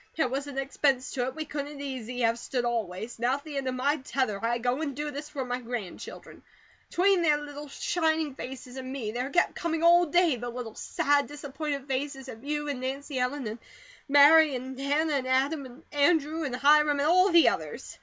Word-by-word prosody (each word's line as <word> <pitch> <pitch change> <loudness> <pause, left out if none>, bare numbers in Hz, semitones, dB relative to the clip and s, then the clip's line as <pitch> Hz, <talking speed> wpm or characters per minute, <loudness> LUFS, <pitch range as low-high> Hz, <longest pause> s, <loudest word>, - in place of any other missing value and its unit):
There 315 - +2
wasn't 275 +2 -4
expense 270 -1 0
to 250 -2 -1
it 260 - -5
we 315 - -4
couldn't 290 -1 -5
easy 250 -3 -5
have 230 0 +2
stood, 245 -1 -2
always. 225 -1 -3
Now, 245 +3 +2
at 285 - -8
the 300 -3 -6
end 270 -1 -2
of 255 - -1
my 280 +4 +1
tether, 255 -6 -2
I 235 +1 +1
go 245 +4 -1
and 285 -4 -3
do 295 +1 -3
this 290 +1 -7
for 275 -4 -4
my 250 0 -3
grandchildren. 230 -6 -7 0.5
'Tween 380 +1 +3
their 305 -3 +4
little 295 0 -8
shining 315 0 0
faces 255 -1 -8
and 260 0 -6
me, 245 -6 -4
there 250 +4 -3
kept 350 - +2
coming 325 -1 -2
all 345 +1 +6
day 335 -3 +3
the 240 +1 -5
little, 240 -2 -6
sad, 285 +4 +1
disappointed 285 -1 -5
faces 270 0 -3
of 225 -1 -10
you 295 +1 -2
and 280 -3 -3
Nancy 270 +1 -4
Ellen, 255 +2 -1
and 220 +2 -5 0.5
Mary, 290 +1 +7
and 260 +1 -6
Hannah, 295 +3 +1
and 265 -2 -1
Adam, 270 +2 +1
and 250 +2 -15
Andrew, 305 +1 +2
and 255 -3 -3
Hiram 295 +2 +4
and 285 - +2
all 365 +4 +5
the 340 -2 +6
others. - - -6
275 Hz, 205 wpm, -28 LUFS, 250-295 Hz, 0.5 s, Mary